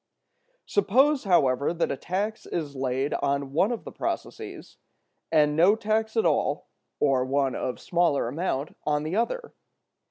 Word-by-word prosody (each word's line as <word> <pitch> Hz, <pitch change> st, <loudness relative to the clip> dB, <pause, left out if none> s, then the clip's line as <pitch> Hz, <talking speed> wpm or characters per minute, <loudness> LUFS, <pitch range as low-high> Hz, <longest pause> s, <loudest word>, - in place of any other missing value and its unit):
Suppose, 290 Hz, -, +3 dB
however, 140 Hz, -4 st, +2 dB
that 170 Hz, -, 0 dB
a -, -, -1 dB
tax 200 Hz, +9 st, -3 dB
is 150 Hz, -5 st, -4 dB
laid 130 Hz, +1 st, -1 dB
on 140 Hz, -1 st, -1 dB
one 190 Hz, +9 st, +3 dB
of 235 Hz, -, -4 dB
the -, -, -8 dB
processes, -, -, -5 dB, 0.5 s
and 150 Hz, -2 st, +4 dB
no 180 Hz, +6 st, +5 dB
tax 220 Hz, +1 st, -1 dB
at 225 Hz, -, +3 dB
all, -, -, 0 dB, 0.3 s
or 135 Hz, -3 st, +3 dB
one 135 Hz, 0 st, 0 dB
of 125 Hz, -, -3 dB
smaller 170 Hz, -8 st, +1 dB
amount, 145 Hz, +1 st, -3 dB
on 150 Hz, 0 st, 0 dB
the 155 Hz, +4 st, -3 dB
other. 455 Hz, -, -2 dB
155 Hz, 150 wpm, -26 LUFS, 140-215 Hz, 0.5 s, no